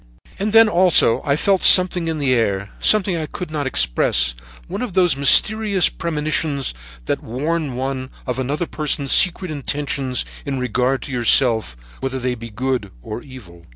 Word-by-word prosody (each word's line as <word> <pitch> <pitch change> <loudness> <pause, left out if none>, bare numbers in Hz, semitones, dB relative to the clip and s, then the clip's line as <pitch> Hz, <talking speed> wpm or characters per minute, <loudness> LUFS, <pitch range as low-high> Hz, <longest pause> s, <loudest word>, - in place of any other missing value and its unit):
"And 205 +2 -2
then 225 +1 +6
also 180 - +3
I 140 - 0
felt 190 +5 +1
something 180 -2 +5
in 160 -1 -2
the 140 -3 +1
air, 100 -4 -1
something 200 -4 +3
I 160 -2 -4
could 180 +1 -7
not 145 -3 -3
express, - - +1 0.3
one - - -6
of 245 -7 -5
those 175 -6 +3
mysterious 200 +7 +5
premonitions 150 - -3 0.3
that - - -2
warn 145 +3 -3
one 130 0 -4 0.2
of 125 -1 -4
another 145 +6 -2
person's 150 -3 -3
secret 180 -1 +2
intentions 140 -2 -3 0.2
in 140 -2 -4
regard 125 +2 -1
to - - -8
yourself, 115 - +2 0.2
whether 135 0 -4
they 125 -1 -2
be 115 -1 -9
good 120 -1 -3
or 110 - -7
evil. 90 - -14
140 Hz, 160 wpm, -19 LUFS, 125-170 Hz, 0.3 s, then